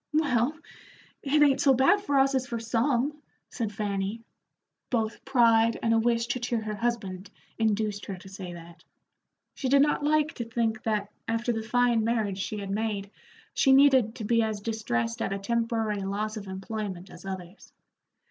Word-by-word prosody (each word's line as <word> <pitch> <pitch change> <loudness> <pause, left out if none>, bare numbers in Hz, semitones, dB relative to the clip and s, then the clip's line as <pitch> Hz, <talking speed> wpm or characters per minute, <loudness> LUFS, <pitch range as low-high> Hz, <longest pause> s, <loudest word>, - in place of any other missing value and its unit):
"Well, 290 -2 +2 0.6
it 295 +2 +3
ain't 280 -2 +4
so 270 -2 +5
bad 275 +11 +4
for 290 -9 0
us 270 0 +4
as 260 -1 0
for 235 -1 -3
some," 245 +5 0 0.3
said 225 -4 -3
Fanny. 205 +1 -3 0.7
Both 225 -3 -1
pride 230 -3 +4
and 230 - +3
a 225 - +4
wish 230 0 +1
to 250 - -1
cheer 240 -1 -1
her 215 -1 -4
husband 205 -4 -3 0.3
induced 215 -2 0
her 195 - -5
to 185 - -13
say 190 -2 -8
that. 170 0 -12 0.7
She 265 - -3
did 275 +1 +6
not 295 0 +1
like 305 +1 +2
to 240 - -4
think 225 -1 -1
that, 210 -2 -1 0.2
after 230 +1 0
the 225 - -2
fine 240 0 +2
marriage 215 -4 0
she 210 +2 -3
had 200 -1 -5
made, 205 -1 -2 0.4
she 270 - +4
needed 265 -5 +5
to 225 - -6
be 230 +2 +2
as 220 -2 -1
distressed 160 - -2
at - - -1
a - - -2
temporary 225 0 -1
loss 205 +3 -2
of 205 -2 -7
employment 190 -1 -5
as - - -12
others. 190 0 -8
225 Hz, 175 wpm, -27 LUFS, 200-245 Hz, 0.7 s, did